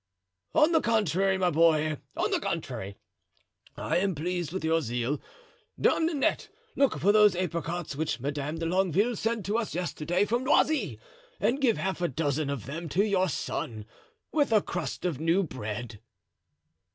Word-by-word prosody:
"On 305 +2 +5
the 320 -2 +4
contrary, 195 - +2
my 180 -1 +2
boy, 155 -2 +3 0.2
on - - 0
the - - +2
contrary, 100 +1 -4 0.8
I - - 0
am 190 0 +1
pleased 175 +1 -2
with 190 -2 -3
your 165 +1 +2
zeal. 120 +2 -2 0.6
Dame 325 - +3
Nanette, 300 -5 0 0.3
look 275 -1 +2
for 200 - +4
those 210 -2 +6
apricots 170 -3 -3
which 150 -5 -2
Madame 145 +4 -3
de 165 - -3
Longueville 190 +6 +2
sent 225 -1 -2
to 210 +4 +1
us 220 - -4
yesterday 175 +1 0
from 240 +4 0
Noisy 300 +3 +2 0.4
and 270 +4 +1
give 240 -5 +3
half 190 -1 -2
a 175 - +2
dozen 145 0 -1
of 140 -7 -4
them 165 +5 -5
to 195 +8 +2
your 190 -3 +2
son, 110 -6 -4 0.5
with 290 -5 +2
a 215 -2 +4
crust 175 -2 -4
of 165 -7 -1
new 165 +5 +2
bread." 115 - -6
175 Hz, 165 wpm, -28 LUFS, 150-205 Hz, 0.8 s, those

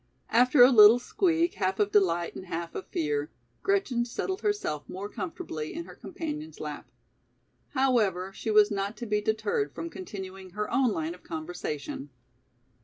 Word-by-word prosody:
After 250 +3 +6
a 250 - +8
little 215 -1 +9
squeak 335 +5 +1
half 190 +1 -1
of 205 -1 +2
delight 175 -4 +2
and 185 - -8
half 170 0 -4
of - - -6
fear, 150 -1 -1 0.3
Gretchen 385 -12 +1
settled 375 - -3
herself 410 - -2
more 195 +2 -5
comfortably 160 -5 -5
in 335 0 -5
her - - -11
companion's 310 -1 -6
lap. - - -6 0.9
However, 210 -9 +2
she 220 - -5
was 210 0 +5
not 200 +1 -2
to 240 - -5
be 210 -1 0
deterred 210 -10 -1
from 165 0 -5
continuing 190 -1 -8
her 210 - -1
own 260 -4 +3
line 160 -3 -2
of 180 - -14
conversation. 155 -3 -5
205 Hz, 160 wpm, -28 LUFS, 175-250 Hz, 0.9 s, little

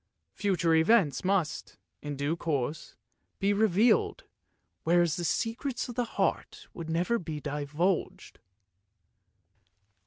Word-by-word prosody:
Future 180 -5 +1
events 160 - +3
must, 185 -5 -1 0.2
in 145 -1 -5
due 140 +4 -1
course, 150 -2 -3 0.4
be 200 +1 +1
revealed, 215 +2 +2 0.6
whereas 170 -1 +3
the 175 - -4
secrets 230 - -2
of 245 - -6
the 245 0 -1
heart - - -1
would 165 -2 -7
never 180 +9 +1
be 160 -3 -5
divulged. 150 +5 -2
170 Hz, 105 wpm, -29 LUFS, 155-205 Hz, 0.6 s, events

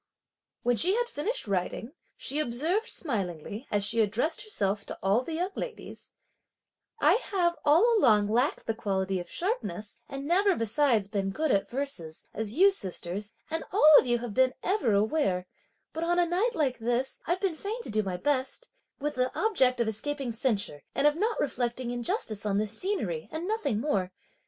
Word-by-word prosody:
When 245 -1 +2
she 370 - +4
had 480 +1 0
finished 460 - -3
writing, 200 +5 -2 0.3
she 280 +3 -1
observed 310 - 0
smilingly, 205 - -2
as 205 -1 0
she 225 +2 +3
addressed 225 +10 0
herself 205 - -1
to - - -6
all 200 +5 +3
the 320 +5 -5
young 360 +4 -1
ladies: 480 -2 -8 0.9
"I 480 - +4
have 350 -3 +1
all 415 +11 +5
along 210 - +5
lacked 240 +7 0
the 225 - -1
quality 195 -3 -1
of 175 -1 -8
sharpness 345 - -3
and 275 0 -6
never 385 +3 +3
besides 230 -3 +2
been 195 -1 -2
good 310 +9 -1
at 195 - +1
verses; 240 - -5
as 220 0 -3
you, 395 +3 +7
sisters, 195 - -2 0.2
and 325 - -1
all 310 -6 +6
of - - -2
you 240 0 +3
have 235 -3 -6 0.3
ever 375 - 0
been 210 - +4
aware; 200 -4 +1 0.5
but, 320 - -3
on 345 +1 +1
a 350 - +4
night 390 +8 0
like 265 -6 0
this 240 +3 -1
I've 350 +3 +1
been 375 -4 -1
fain 415 +8 -5
to - - -5
do 215 0 +2
my 190 -3 -3
best, 270 - -1 0.3
with 295 +1 -2
the 255 0 0
object 260 - +3
of 235 - +1
escaping 265 +4 -2
censure, 215 - 0
and 280 - +1
of 295 0 +4
not 435 +6 -1
reflecting 245 -3 -2
injustice 230 -3 -1
on 200 -2 0
this 215 +1 0
scenery 215 - -2
and 325 +3 -4
nothing 435 - -1
more. 200 -9 -1
255 Hz, 180 wpm, -28 LUFS, 210-340 Hz, 0.9 s, you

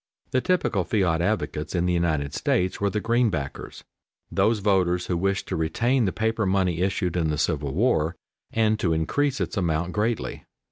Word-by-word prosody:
The 130 - +2
typical 175 - +1
fiat 85 -5 +1
advocates 85 -5 -2
in 90 0 +1
the 90 - +1
United 80 -5 0
States 90 +2 0
were 100 - +2
the 105 - -1
"Greenbackers," 105 - -1 0.5
those 110 +1 +2
voters 95 -3 +1
who 90 - -1
wished 100 +2 -1
to - - -1
retain 115 +11 +1
the 95 - +1
paper 110 0 0
money 95 -3 +1
issued 95 -2 0
in 80 -3 +1
the 75 - -1
Civil 75 -2 -1
War, 90 -7 +2 0.4
and 110 -1 +2
to 85 -3 +1
increase 135 - 0
its - - -2
amount 85 -1 0
greatly. 110 +2 -2
95 Hz, 175 wpm, -25 LUFS, 80-110 Hz, 0.5 s, The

